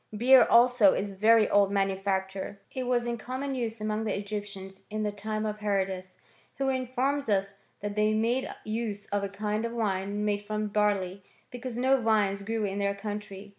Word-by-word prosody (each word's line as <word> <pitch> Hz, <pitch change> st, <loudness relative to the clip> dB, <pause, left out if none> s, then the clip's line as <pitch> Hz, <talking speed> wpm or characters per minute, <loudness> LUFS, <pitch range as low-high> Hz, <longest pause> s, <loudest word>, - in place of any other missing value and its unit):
* -, -, -5 dB
Beer 255 Hz, +3 st, +7 dB
also 235 Hz, -4 st, +6 dB
is 200 Hz, 0 st, -2 dB
a -, -, -11 dB
very 220 Hz, +2 st, +5 dB
old 200 Hz, -1 st, +3 dB
manufacture. 195 Hz, 0 st, -1 dB
It 255 Hz, -1 st, -3 dB
was 245 Hz, -1 st, +1 dB
in 235 Hz, -1 st, -3 dB
common 260 Hz, +4 st, -4 dB
use 230 Hz, -3 st, -3 dB
among 215 Hz, +1 st, -2 dB
the 220 Hz, -, -1 dB
Egyptians 200 Hz, -2 st, -6 dB
in 215 Hz, 0 st, -2 dB
the 210 Hz, -, 0 dB
time 215 Hz, +1 st, -3 dB
of 210 Hz, 0 st, -3 dB
Herodus, 190 Hz, -3 st, -2 dB, 0.4 s
who 270 Hz, -1 st, 0 dB
informs 260 Hz, +1 st, -1 dB
us 195 Hz, -1 st, +1 dB, 0.3 s
that 205 Hz, 0 st, -4 dB
they 215 Hz, 0 st, +2 dB
made 235 Hz, +4 st, 0 dB
use 215 Hz, -2 st, -3 dB
of 205 Hz, 0 st, 0 dB
a 200 Hz, -, -2 dB
kind 210 Hz, +2 st, -2 dB
of 235 Hz, 0 st, -3 dB
wine 205 Hz, -2 st, -1 dB
made 205 Hz, -1 st, 0 dB
from 210 Hz, 0 st, -3 dB
barley, 200 Hz, -2 st, 0 dB, 0.3 s
because 245 Hz, -1 st, -6 dB
no 260 Hz, +1 st, +3 dB
vines 210 Hz, -3 st, +2 dB
grew 220 Hz, +2 st, -2 dB
in 200 Hz, 0 st, -3 dB
their 200 Hz, 0 st, 0 dB
country. 205 Hz, -1 st, -6 dB
210 Hz, 190 wpm, -28 LUFS, 200-230 Hz, 0.4 s, Beer